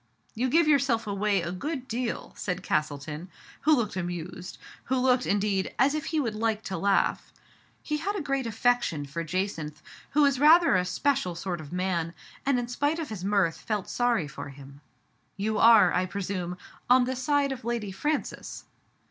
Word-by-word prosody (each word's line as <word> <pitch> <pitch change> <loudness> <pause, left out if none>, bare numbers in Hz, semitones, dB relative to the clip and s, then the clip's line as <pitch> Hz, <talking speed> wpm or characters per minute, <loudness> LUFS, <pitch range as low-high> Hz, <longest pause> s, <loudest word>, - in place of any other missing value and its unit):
"You 250 +3 0
give 330 +4 +4
yourself 270 -6 +3
away 200 -2 0
a 170 - -3
good 260 - -4
deal," 240 0 -3
said 180 0 -3
Castleton, 150 +1 -2 0.3
who 310 +1 +4
looked 230 -8 -1
amused 175 0 -5
— - - -20
who 260 - 0
looked, 250 0 +2
in 205 - +2
deed, 195 -2 -1
as 270 +3 +4
if 305 -2 -2
he 315 +1 0
would 235 -7 -1
like 220 0 -1
to 190 - -4
laugh. 200 0 +1 0.5
He 300 - -1
had 400 +6 -2
a - - -1
great 275 -4 -1
affection 225 -9 +1
for 150 +4 -4
Jacynth, 165 -4 -3 0.3
who 295 +1 +3
was 280 -2 +3
rather 325 - +6
a 180 0 +2
special 185 -2 0
sort 175 -1 -4
of 145 - -11
man, 180 -2 -1 0.3
and 275 -2 +3
in 245 -1 -2
spite 290 +6 0
of 325 -3 -4
his 210 -5 -6
mirth 195 -4 +2
felt 210 -4 -3
sorry 240 -9 +1
for 140 0 -8
him. 140 +1 -13 0.3
" 125 +9 -38
Yoli 215 +1 0
are, 225 -2 +7
I 185 +1 +1
presume, 180 -2 -4 0.3
on 250 0 +6
the 260 +1 -2
side 280 +2 +1
of 255 -3 -5
Lady 230 -3 -2
Francis." 295 +10 -3
210 Hz, 190 wpm, -27 LUFS, 180-260 Hz, 0.5 s, are